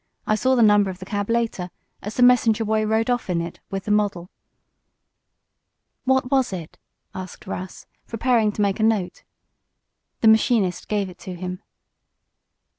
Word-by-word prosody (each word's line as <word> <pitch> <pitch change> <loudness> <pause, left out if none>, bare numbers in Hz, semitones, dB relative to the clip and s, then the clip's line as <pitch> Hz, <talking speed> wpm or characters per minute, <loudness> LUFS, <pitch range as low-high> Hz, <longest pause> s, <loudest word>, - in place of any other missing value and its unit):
I - - +1
saw 260 +4 +2
the 240 - +4
number 205 -2 +5
of 185 - -6
the 185 - -9
cab, 205 +1 -3
later, 230 -6 -1 0.3
as 210 - -6
the 250 - +3
messenger 230 -3 +4
boy 215 0 +1
rode 225 +2 +1
off 245 -5 -2
in 175 -2 +1
it 170 0 -6
with 195 -1 -4
the 210 - -1
model." 200 -4 0 1.7
"What 265 -1 +1
was 265 -4 +2
it?" 175 -4 -7 0.3
asked 185 -1 -8
Russ, 185 +1 -7 0.2
preparing 230 -2 +1
to 210 - 0
make 200 0 0
a - - +1
note. 215 -5 0 1.0
The 225 - +4
machinist 220 -4 +3
gave 205 -2 -1
it 180 -1 -12
to 185 0 -7
him. 180 +2 -6
210 Hz, 165 wpm, -23 LUFS, 185-230 Hz, 1.7 s, number